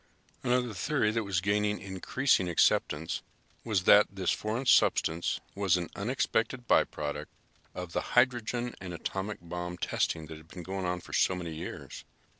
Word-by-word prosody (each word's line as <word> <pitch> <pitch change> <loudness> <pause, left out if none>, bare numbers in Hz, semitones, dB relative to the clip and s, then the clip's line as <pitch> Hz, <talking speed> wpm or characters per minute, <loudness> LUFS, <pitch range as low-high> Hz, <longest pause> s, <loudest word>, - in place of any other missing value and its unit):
Another 125 -2 +1
theory 105 +1 +1
that 115 -1 -1
was 95 -3 0
gaining 105 +1 +1
increasing 95 +1 +1
acceptance 80 -1 +2 0.4
was 105 -5 0
that 105 +2 +7
this 95 -2 -1
foreign 110 +5 -2
substance 85 -8 +3
was 95 -3 +2
an 85 -1 -4
unexpected 120 +2 -1
by - - +6
product 75 -1 -5 0.4
of 90 -1 -6
the - - 0 0.2
hydrogen 120 -1 +2
and 90 -2 -6
atomic 95 +5 -4
bomb 90 +1 -5
testing 80 -2 -1
that 80 0 -9
had 80 0 -16
been 90 +1 -9
going 95 +1 -4
on 90 0 -2
for - - -12
so 95 - +3
many 85 -3 -5
years. 80 +2 -7
95 Hz, 160 wpm, -30 LUFS, 90-115 Hz, 0.4 s, that